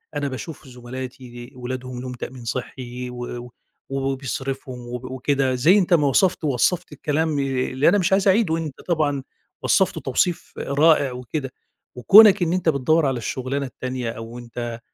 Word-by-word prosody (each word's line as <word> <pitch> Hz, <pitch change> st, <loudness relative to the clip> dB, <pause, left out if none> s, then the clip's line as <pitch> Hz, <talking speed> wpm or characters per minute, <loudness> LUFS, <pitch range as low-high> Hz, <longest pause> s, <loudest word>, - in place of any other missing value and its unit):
أنا 145 Hz, -1 st, -1 dB
باشوف 140 Hz, +2 st, -7 dB
زُمَلاتي 125 Hz, 0 st, -8 dB
أولادهم 125 Hz, 0 st, -5 dB
لهم 130 Hz, 0 st, -6 dB
تأمين 125 Hz, 0 st, -8 dB
صحِّي، 125 Hz, +1 st, -5 dB
و 125 Hz, -, -9 dB, 0.3 s
و 125 Hz, -, -13 dB, 0.4 s
و 135 Hz, -, -3 dB
وبيصرِفوا، 135 Hz, 0 st, -4 dB, 0.2 s
وب 125 Hz, +1 st, -7 dB
وكده، 130 Hz, 0 st, 0 dB
زي 160 Hz, +11 st, +5 dB
أنت 185 Hz, -3 st, +2 dB
ما 150 Hz, -4 st, +4 dB
وصَفت 175 Hz, +5 st, +2 dB
ووصَّفت 150 Hz, +5 st, +1 dB
الكلام، 150 Hz, +1 st, -1 dB
ي 135 Hz, -2 st, -1 dB
اللي 130 Hz, +4 st, +3 dB
أنا 200 Hz, -, +4 dB
مش 185 Hz, -1 st, +1 dB
عايز 195 Hz, +1 st, +3 dB
أعيدُه، 190 Hz, -4 st, +3 dB
أنت 155 Hz, -4 st, -6 dB
طبعًا 145 Hz, -5 st, 0 dB, 0.4 s
وصَّفته -, -, +2 dB
توصيف 175 Hz, -2 st, -1 dB
رائع 145 Hz, -1 st, +3 dB
وكده، 130 Hz, +2 st, -5 dB, 0.4 s
وكونَك 200 Hz, -, +8 dB
إن 170 Hz, -, 0 dB
أنت 180 Hz, -2 st, +1 dB
بتدوَّر 155 Hz, +2 st, +2 dB
على 135 Hz, -2 st, 0 dB
الشغلانة 130 Hz, +4 st, -3 dB
التانية، 130 Hz, -2 st, -4 dB
أو 115 Hz, +1 st, -8 dB
أنت 120 Hz, -1 st, -6 dB
135 Hz, 160 wpm, -22 LUFS, 125-155 Hz, 0.4 s, وكونَك